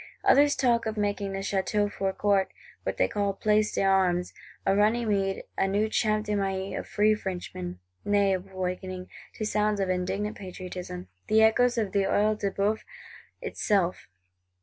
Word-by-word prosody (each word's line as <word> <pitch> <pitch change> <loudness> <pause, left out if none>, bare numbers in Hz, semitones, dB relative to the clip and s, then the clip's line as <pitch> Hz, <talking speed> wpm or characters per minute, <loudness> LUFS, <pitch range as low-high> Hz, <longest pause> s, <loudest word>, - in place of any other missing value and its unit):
Others 285 +1 +5
talk 235 -3 +2
of 220 0 -3
making 205 -1 -1
the 195 - -3
Château 205 +1 0
Forecourt, 195 0 0 0.3
what - - -3
they - - +3
call 200 -1 -1
Place 210 +1 +1
d'Armes, 185 -2 +2 0.3
a 195 - +3
Runnymede 205 -2 +1
and 195 - +1
new 210 +2 +2
Champ 215 -1 +1
de 210 - -1
Mai 195 -1 -1
of - - -5
free 215 +1 +3
Frenchmen: 175 - -5 0.3
nay 200 -1 +3
of 190 +1 -4
awakening, 185 0 -4 0.3
to 215 - -3
sounds 210 -1 +1
of 195 -1 0
indignant 190 +3 -2
Patriotism, 180 - -7 0.2
the 220 +1 +5
echoes 245 +2 +4
of 215 -4 0
the 200 -1 +2
Œil 215 +2 +2
de 200 - 0
boeuf 200 +3 0 0.6
itself. 190 -4 0
200 Hz, 155 wpm, -27 LUFS, 190-215 Hz, 0.6 s, Others